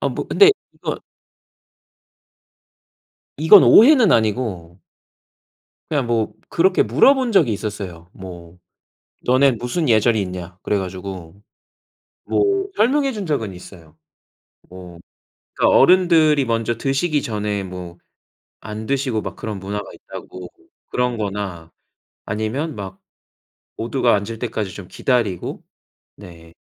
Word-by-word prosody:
아 - - 0
뭐 - - -5
근데 405 0 +6 0.2
이건 - - -5 2.4
이건 160 +6 +7
오해는 245 -3 +6
아니고. 105 -6 -1 1.1
그냥 140 -6 -1
뭐 115 -2 -1 0.2
그렇게 185 +2 +2
물어본 245 - +3
적이 155 - +3
있었어요. 95 -5 -6
뭐 90 -2 -11 0.7
"너네 130 +2 +4
무슨 125 +7 -3
예절이 110 -1 +3
있냐?" 90 -1 -7
그래가지고 95 -1 -5 0.8
뭐 395 -1 +1
설명해준 260 -4 +1
적은 115 - -2
있어요. 85 -3 -14 0.7
뭐 90 -2 -12 0.5
그니까 - - +2
어른들이 160 -4 +4
먼저 115 0 -1
드시기 140 +4 0
전에 105 -2 -3
뭐 90 -2 -9 0.7
안 110 0 -7
드시고 130 -5 -1
막 95 -1 -6
그런 105 -3 -6
문화가 100 +1 -6
있다고. 90 -1 -10 0.4
그런 125 -1 -1
거나 95 -5 -5 0.5
아니면 115 +9 -3
막 100 - -8 0.8
모두가 120 +1 +1
앉을 105 +2 -3
때까지 110 -5 -4
좀 95 -2 -10
기다리고 115 -9 -2 0.5
네. 85 -2 -14
110 Hz, 235 characters per minute, -20 LUFS, 95-140 Hz, 2.4 s, 이건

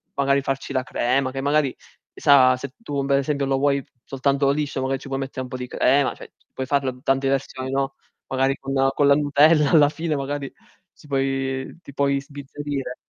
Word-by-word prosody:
magari 140 0 +2
farci 135 0 -3
la 130 - +1
crema, 130 +1 0
che 135 - -5
magari 145 -1 +1 0.4
chissà 130 -3 +5
se 135 +1 -7
tu 140 -11 -3
per 140 0 +3
esempio 140 0 -1
lo 135 0 +1
vuoi 140 -1 +1 0.2
soltanto 140 +1 0
liscio, 145 -1 -1
magari 135 +1 -1
ci 140 - -11
puoi 135 0 -3
mettere 135 -1 -5
un 130 - -6
po' 130 - -5
di 125 0 -6
crema, 135 +2 +2
cioè, - - -13 0.2
puoi 130 - -4
farlo 135 -2 -1
tante 135 0 +1
versioni, 130 -1 -2
no, 135 0 -1 0.3
magari 135 +1 +1
con 135 0 -5 0.2
con 145 - +3
la 140 - +6
nutella 150 +1 +4
alla 150 -3 +6
fine 160 0 -3
magari 140 0 -4 0.4
si - - -21
puoi 135 0 -2
ti 140 - -12
puoi 140 -1 +1
sbizzarrire. 140 -1 -6
135 Hz, 195 wpm, -23 LUFS, 135-140 Hz, 0.4 s, la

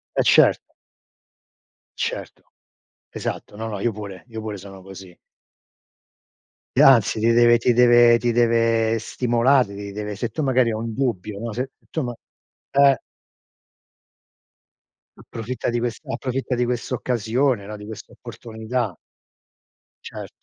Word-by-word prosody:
Eh - - +2
certo. - - +4 1.3
Certo. - - -4 0.7
Esatto. - - -6
No, 110 +1 -5
no 105 -3 -5
io 120 +3 0
pure 100 -3 -9
io 110 -1 -7
pure 110 -1 -5
sono 95 0 -12
così. 95 -2 -12 1.6
E - - +6
anzi 115 -5 +5
ti 115 +2 +3
deve 120 0 +5
ti 120 +1 +2
deve 120 -1 +6
ti 120 0 0
deve 115 -1 +2
stimolare, 120 0 +1
ti 100 0 -7
deve 105 0 -5
se 115 +4 -3
tu 150 +8 -3
magari 130 -3 +2
hai 110 - -2
un 115 0 -4
dubbio, 105 -5 -2
no, 115 +1 -4
se 125 +5 -4 0.2
tu 160 - -2
ma 120 -1 -4 0.6
eh. 140 -1 +5 2.2
Approfitta 120 +2 -5
di 120 - -1
questa 120 -1 -4
approfitta 130 +1 -3
di 125 0 +1
questa 125 +1 -3
occasione, 120 -1 0
no, 105 +1 -7
di 105 0 -10
questa 110 -1 -10
opportunità. 110 -2 -5 1.1
Certo. - - -8
115 Hz, 135 wpm, -22 LUFS, 105-125 Hz, 2.2 s, E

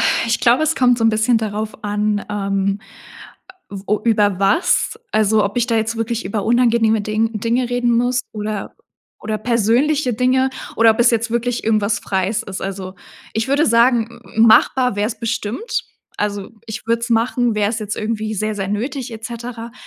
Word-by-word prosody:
Äh, - - +1
ich 230 - 0
glaube, 245 +5 +4
es 315 +1 +1
kommt 245 -3 +3
so 225 - 0
'n - - +6
bisschen 220 +2 +2
darauf 215 0 -5
an, 210 0 -1
ähm, 195 -1 -1 1.1
o 210 +2 +1
über 210 -4 +2
was, 320 - +2
also, 215 0 +3
ob 200 - -3
ich 240 -1 +2
da 230 -2 +1
jetzt 225 +1 -1
wirklich 230 +1 -2
über 200 +2 -3
unangenehme 230 -2 +3
Ding 215 +1 -1
Dinge 235 +3 0
reden 245 -1 +1
muss 245 +1 +1
oder 210 -1 -5 0.5
oder 215 0 -3
persönliche 245 +5 +1
Dinge 255 +3 +2 0.3
oder 230 0 +6
ob 220 - -3
es 240 - +5
jetzt 230 0 0
wirklich 235 +1 -1
irgendwas 215 -1 +1
Freies 190 +2 -1
ist. 190 -1 -7
Also, 190 -1 -5 0.4
ich 220 +3 -1
würde 285 +3 +2
sagen, 235 0 +4
m - - -14 0.2
m 220 - +4
machbar 250 +2 +4
wär's 210 +2 -1
bestimmt. 230 - -3 0.3
Also, 205 -1 -3 0.2
ich 220 0 -7
würde 230 0 +1
es 235 - -4
machen, 235 0 +1
wäre 210 -1 +1
es 225 - -3
jetzt 210 0 -4
irgendwie 215 0 -3
sehr, 215 +1 -2
sehr 195 -2 -3
nötig 245 +5 -3
et 225 0 -9
cetera. 235 0 -7
225 Hz, 185 wpm, -19 LUFS, 210-240 Hz, 1.1 s, n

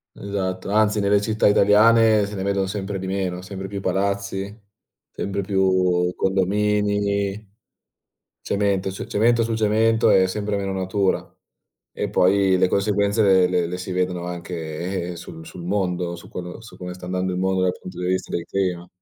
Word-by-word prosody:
Esatto, 95 -2 -4
anzi 105 0 +3
nelle 100 0 +3
città 110 0 +1
italiane 110 +1 +5
se 105 +1 -7
ne 95 - -3
vedono 100 -1 0
sempre 100 -1 -4
di 95 - -5
meno, 95 -2 -2
sempre 95 0 -7
più 100 -1 -4
palazzi, 100 +1 -2 0.6
sempre 100 0 -4
più 95 -2 +2
condomini, 100 +1 0 0.9
cemento, 100 -1 0
ce 95 - -6
cemento 115 +2 +2
su 115 0 -1
cemento, 110 +1 +3
e 95 - +5
sempre 105 +1 -2
meno 100 -1 -2
natura. 95 +1 0 0.7
E - - -3
poi 95 0 +3
le 90 - +3
conseguenze 100 +1 +1
le 95 -2 +5
le 90 -2 +1
le 90 +1 -4
si 95 +1 -6
vedono 90 -1 -1
anche, 85 +1 -4
eh, - - -7
sul 80 -1 -10
sul 90 - -10
mondo, 90 -3 -1
su 85 - -13
quello 90 +4 -7
su 110 - -13
come 90 0 -6
sta 90 0 -10
andando 90 0 -1
il 90 - -2
mondo 95 0 +1
dal 90 0 0
punto 90 -1 -9
di 90 - -2
vista 95 0 -1
del 85 -1 -3
clima. 90 -3 -2
95 Hz, 170 wpm, -22 LUFS, 90-100 Hz, 0.9 s, italiane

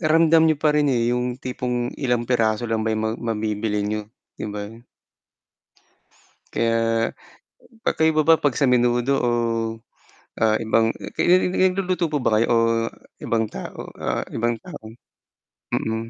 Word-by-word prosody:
ramdam 160 0 +4
niyo 155 - +2
pa 150 +1 +2
rin 150 -1 +2
eh, 120 -2 +1
yung 125 0 -1
tipong 125 -1 -3
ilang 120 -4 0
piraso 115 -2 +1
lang 115 -1 -1
ba 110 0 0
yung 110 - -2
ma 110 - 0 0.2
mabibili 105 -1 -2
niyo, 105 0 -3 0.3
'di - - -4
ba? 105 0 -5 1.9
Kaya, 115 0 +1 0.7
magkaiba 160 -1 +2
ba 160 0 +5
pag 145 -5 +1
sa 145 - +2
menudo 125 0 +2
o 120 - +1 1.1
ah, 110 -1 +3
eh, 115 - -5
nag-luluto 180 - +1
po 150 - 0
ba 110 - +2
kayo 115 - +2
o 115 - +4 0.7
ibang 110 -1 0
tao - - -8
ah, - - -2
ibang 115 +1 -1
tao, - - -10 0.9
mm. 110 +1 -2
120 Hz, 140 wpm, -22 LUFS, 110-145 Hz, 1.9 s, ba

